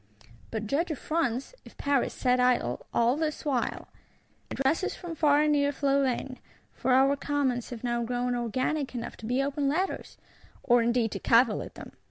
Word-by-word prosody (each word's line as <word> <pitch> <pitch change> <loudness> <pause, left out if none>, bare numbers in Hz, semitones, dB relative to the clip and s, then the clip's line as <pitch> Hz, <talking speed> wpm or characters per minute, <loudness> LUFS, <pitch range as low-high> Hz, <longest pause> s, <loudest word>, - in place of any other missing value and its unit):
But 220 -1 -4
judge 295 - 0
if 310 - -3
France, 275 - -2
if - - -16
Paris 280 -2 +1
sat 250 -1 +1
idle, 245 - +1
all 235 +2 +3
this 310 0 -3
while! 265 -5 -1 0.6
Addresses 290 +8 0
from 350 -2 -7
far 295 -2 +3
and 305 - +2
near 285 -1 +2
flow 280 0 +1
in: 255 0 -3 0.3
for 260 - -1
our 270 +2 +5
Commons 275 -4 -1
have 240 -2 -8
now 240 -1 0
grown 245 +1 -1
organic 255 +4 -1
enough 235 -1 -5
to 245 +4 -1
open 280 0 -1
letters. 365 +7 -2 0.5
Or 240 -1 +4
indeed 235 -1 +1
to - - -4
cavil 230 -2 +4
at - - -9
them! - - -10
260 Hz, 175 wpm, -28 LUFS, 240-290 Hz, 0.6 s, our